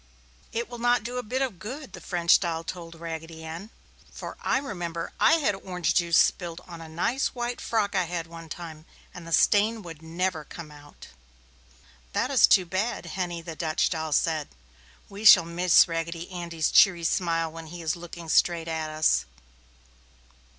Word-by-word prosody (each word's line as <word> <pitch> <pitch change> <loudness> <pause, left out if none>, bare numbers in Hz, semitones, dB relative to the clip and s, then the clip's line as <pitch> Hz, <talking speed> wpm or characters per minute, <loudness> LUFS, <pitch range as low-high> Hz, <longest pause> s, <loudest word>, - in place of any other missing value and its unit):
"It 235 +1 -2
will 240 -1 -9
not 240 -1 +2
do 245 +3 -4
a - - -1
bit 255 +4 -1
of 225 -10 -4
good!" 260 +8 -7
the - - -9
French 170 -2 +3
doll 165 -3 -2
told 170 -1 -7
Raggedy 165 -1 -7
Ann, 165 +6 -7 0.4
"for - - -8
I - - +1
remember 175 - -4
I - - +6
had 305 -9 +2
orange 180 -3 -2
juice 170 -2 +3
spilled 170 -2 +2
upon 170 -2 -11
a 160 - -10
nice 230 +14 -1
white 240 0 -3
frock 215 -3 0
I 185 -2 +1
had 170 -1 -4
one 165 -1 -11
time, 160 -1 -8 0.3
and 175 -2 -10
the - - -8
stain 215 +5 +3
would 165 -3 -10
never 165 0 -2
come 155 0 -10
out!" 145 0 -14 1.0
"That 230 +7 0
is 270 - +6
too 185 -3 +5
bad!" 195 +7 -2
Henny, 175 -3 -4
the 165 -1 -7
Dutch 160 -1 0
doll, 160 -2 -3
said. 155 0 +1 0.6
"We 200 +2 -9
shall 185 -5 +9
miss 175 +1 +5
Raggedy 165 +1 -4
Andy's 170 -3 -2
cheery 175 -4 +5
smile 165 -1 0
when 165 0 -9
he 170 +1 -8
is 155 -1 0
looking 170 -1 -9
straight 170 +1 +2
at 160 -1 -3
us!" 155 - +2
170 Hz, 180 wpm, -26 LUFS, 165-200 Hz, 1.0 s, shall